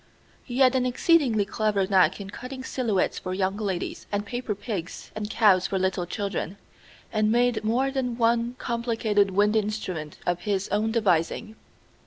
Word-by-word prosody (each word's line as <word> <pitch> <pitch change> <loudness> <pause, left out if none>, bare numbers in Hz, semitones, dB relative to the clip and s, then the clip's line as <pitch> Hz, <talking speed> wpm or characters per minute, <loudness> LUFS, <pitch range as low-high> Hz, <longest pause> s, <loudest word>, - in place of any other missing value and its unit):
He 245 -1 -6
had 260 -1 +5
an 260 -1 +2
exceedingly 250 - +3
clever 205 -1 0
knack 185 -2 +3
in 195 -1 -7
cutting 260 +4 -7
silhouettes 235 -7 0
for 185 0 -4
young 190 0 0
ladies 195 -5 -3
and 205 0 -1
paper 240 -1 -3
pigs 195 -4 -6
and 210 -1 -4
cows 205 -5 +4
for 195 - -1
little 190 -1 0
children, 195 -1 -3 0.6
and 215 0 +2
made 240 -2 +2
more 250 +5 +1
than 250 -3 -2
one 235 +1 +2
complicated 225 -4 0
wind 205 +3 +2
instrument 200 -8 -2
of 175 -1 0
his 200 0 -1
own 215 +2 +1
devising. 210 -1 0
215 Hz, 160 wpm, -26 LUFS, 195-235 Hz, 0.6 s, had